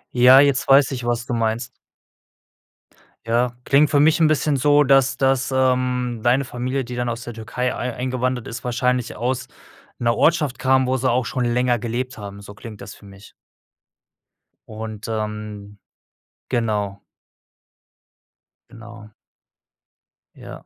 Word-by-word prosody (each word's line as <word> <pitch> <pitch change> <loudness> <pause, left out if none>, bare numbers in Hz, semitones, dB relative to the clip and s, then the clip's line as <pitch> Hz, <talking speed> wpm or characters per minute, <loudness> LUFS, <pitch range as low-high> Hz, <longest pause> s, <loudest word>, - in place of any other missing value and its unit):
Ja, 125 +2 +7
jetzt 140 -2 +1
weiß 135 0 +5
ich, 125 -3 -5
was 120 0 -1
du 125 - -4
meinst. 115 0 -1 1.5
Ja, 120 +1 +1
klingt 145 +3 +3
für 145 - +3
mich 155 +2 +4
'n 160 - +5
bisschen 150 -1 +1
so, 145 +2 +4
dass 135 -2 +3
dass, 135 -1 +1
ähm, 125 -2 0
deine 125 +3 +3
Familie, 130 +2 -3
die 125 0 -7
dann 120 0 -2
aus 120 0 -4
der 120 - -7
Türkei 115 +3 -3
ei 125 0 -4
eingewandert 125 -1 -2
ist, 115 +2 -8
wahrscheinlich 125 0 -1
aus 125 +3 -2 0.5
'ner 115 -1 +1
Ortschaft 150 -6 +1
kam, 130 0 +2
wo 130 +1 +1
sie 130 +1 0
auch 125 +1 +1
schon 125 -2 -2
länger 120 0 +1
gelebt 120 +2 -4
haben, 100 -1 -9
so 100 0 -11
klingt 105 0 -11
das - - -9
für - - -18
mich. 100 0 -15 1.4
Und, 110 -1 -8
ähm 105 -2 -5 0.7
genau. 105 -5 -2 1.7
Genau. 110 -2 -13 1.2
Ja. - - -11
125 Hz, 140 wpm, -21 LUFS, 115-130 Hz, 1.7 s, Ja